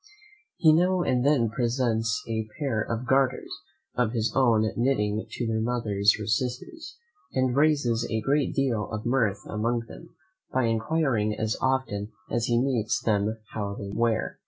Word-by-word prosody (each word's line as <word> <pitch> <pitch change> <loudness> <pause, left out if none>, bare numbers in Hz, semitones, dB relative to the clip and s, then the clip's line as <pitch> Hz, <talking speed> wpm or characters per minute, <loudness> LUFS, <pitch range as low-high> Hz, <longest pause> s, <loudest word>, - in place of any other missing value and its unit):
He 160 -3 +6
now 180 +3 +3
and 125 -5 +1
then 130 -6 +3
presents 115 -1 0
a 110 -1 -2
pair 135 -8 -1
of 115 +3 -3
garters 130 0 +1 0.4
of 120 -2 0
his 115 -1 0
own 115 -5 +4
knitting 110 -4 0
to 120 - -3
their 110 -1 0
mothers 110 -4 +2
or 105 - -4
sisters; 125 - -3 0.4
and 130 -1 +1
raises 140 -6 +2
a 110 - 0
great 140 +6 0
deal 120 -7 0
of 110 0 -5
mirth 115 -5 +1
among 115 +3 -1
them, - - -13 0.4
by 130 - +1
enquiring 115 -2 +1
as 110 0 -1
often 120 -6 -1 0.2
as 120 -1 0
he 120 -1 +2
meets 120 -4 0
them 105 0 0 0.2
how 100 -2 -3
they 100 -1 -6
wear! 115 0 0
115 Hz, 155 wpm, -26 LUFS, 110-130 Hz, 0.4 s, He